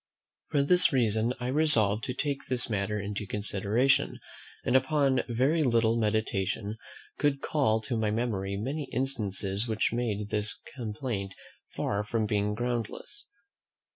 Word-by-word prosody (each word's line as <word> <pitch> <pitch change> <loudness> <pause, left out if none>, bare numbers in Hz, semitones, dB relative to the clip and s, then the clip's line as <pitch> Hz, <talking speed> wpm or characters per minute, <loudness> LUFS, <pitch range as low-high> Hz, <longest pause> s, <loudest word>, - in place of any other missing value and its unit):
For 140 -2 +2
this 180 +4 +5
reason, 115 -2 +2
I 125 0 -3
resolved 115 -8 +3
to 125 - -4
take 140 0 -2
this 125 -2 +4
matter 105 0 -1
into 105 0 -4
consideration; 110 +8 +1 0.5
and, - - +1
upon 135 0 +3
very 135 +8 +2
little 115 -4 +3
meditation, 110 -1 -1 0.4
could 145 -2 +2
call 110 -8 +1
to 115 +2 -3
my 110 -1 0
memory 105 -3 -2
many 135 +7 -3
instances 105 -5 -1
which 110 0 0
made 105 -4 -2
this 105 0 -1 0.2
complaint 110 -4 -4 0.4
far 100 +1 -1
from 110 +1 -1
being 105 0 0
groundless. 120 - -4
115 Hz, 135 wpm, -29 LUFS, 105-130 Hz, 0.5 s, this